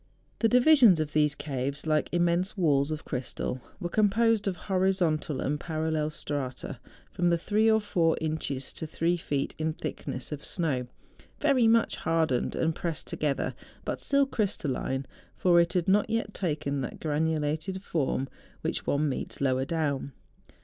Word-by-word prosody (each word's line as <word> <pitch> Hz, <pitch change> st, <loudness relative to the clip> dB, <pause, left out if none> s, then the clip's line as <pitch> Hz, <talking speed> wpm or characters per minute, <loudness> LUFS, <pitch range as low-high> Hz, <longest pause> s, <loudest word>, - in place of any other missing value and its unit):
The 225 Hz, -, +3 dB
divisions 250 Hz, -, +6 dB
of 155 Hz, -1 st, -2 dB
these 150 Hz, -1 st, +3 dB
caves, 140 Hz, 0 st, -3 dB
like 155 Hz, -1 st, +1 dB
immense 175 Hz, +3 st, +1 dB
walls 145 Hz, -5 st, +3 dB
of 155 Hz, -1 st, -4 dB
crystal, 125 Hz, -1 st, -3 dB, 0.2 s
were 175 Hz, -, -2 dB
composed 215 Hz, +3 st, +2 dB
of 190 Hz, -, 0 dB
horizontal 185 Hz, -6 st, +1 dB
iind 145 Hz, +3 st, -1 dB
parallel 155 Hz, -1 st, -1 dB
strata 135 Hz, -4 st, -5 dB, 0.3 s
from 175 Hz, -1 st, +1 dB
thr^e 210 Hz, +6 st, +3 dB
or 220 Hz, -, +4 dB
four 170 Hz, -6 st, +1 dB
inches 155 Hz, -4 st, -3 dB
to 160 Hz, -, -5 dB
three 165 Hz, +3 st, +1 dB
feet 145 Hz, -5 st, -2 dB
in 155 Hz, 0 st, 0 dB
thickness 145 Hz, -4 st, -5 dB
of 150 Hz, -1 st, -5 dB
snow, 140 Hz, -8 st, -1 dB, 0.5 s
very 275 Hz, -6 st, +4 dB
much 230 Hz, 0 st, +3 dB
hardened 160 Hz, -6 st, 0 dB
and 165 Hz, 0 st, +1 dB
pressed 165 Hz, -1 st, -4 dB
together, 145 Hz, -2 st, -1 dB, 0.3 s
but -, -, -3 dB
still 280 Hz, 0 st, +3 dB
crystalline; 145 Hz, -, -1 dB, 0.3 s
for 175 Hz, -2 st, +5 dB
it 170 Hz, 0 st, +2 dB
had 180 Hz, -2 st, 0 dB
not 205 Hz, +2 st, +3 dB
yet 225 Hz, -2 st, -1 dB
taken 145 Hz, -5 st, -2 dB
that 125 Hz, -, -5 dB
granulated 155 Hz, +4 st, -1 dB
form 135 Hz, -6 st, -1 dB, 0.3 s
which -, -, -3 dB
one 150 Hz, +2 st, +2 dB
meets 135 Hz, -, -4 dB
lower 130 Hz, -1 st, +1 dB
down. 145 Hz, -3 st, -1 dB
160 Hz, 150 wpm, -28 LUFS, 145-190 Hz, 0.5 s, divisions